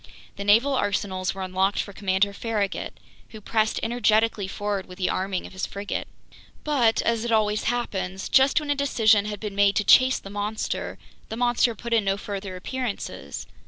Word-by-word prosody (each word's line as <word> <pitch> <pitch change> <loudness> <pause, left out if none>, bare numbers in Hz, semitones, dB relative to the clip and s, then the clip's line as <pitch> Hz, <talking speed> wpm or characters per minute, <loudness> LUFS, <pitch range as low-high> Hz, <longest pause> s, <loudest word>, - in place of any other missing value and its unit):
The 200 - -5
naval 225 +8 +4
arsenals 195 -5 -1
were 190 - -4
unlocked 190 +2 0
for 200 - -3
Commander 195 +1 +1
Farragut, 210 -2 -2 0.4
who 220 - -10
pressed 220 +1 0
energetically 225 -3 +2
forward 200 -1 -3
with 180 - -11
the 185 - 0
arming 190 -1 -2
of - - -11
his 185 - -3
frigate. 200 0 -4 0.6
But, 250 -7 +2
as 230 -1 0
it 235 - -2
always 215 -1 +1
happens, 190 -6 -2
just 270 +4 +4
when 300 -1 -3
a - - +2
decision 225 -7 +3
had 210 -1 -5
been 210 -1 -5
made 200 0 +3
to 210 - +2
chase 260 +5 +6
the 195 - -10
monster, 205 +1 -3 0.3
the 220 - -5
monster 240 -1 +2
put 235 +3 -5
in 225 -2 +3
no 195 0 +1
further 200 -2 -6
appearances. 185 - -5
210 Hz, 180 wpm, -25 LUFS, 195-230 Hz, 0.6 s, chase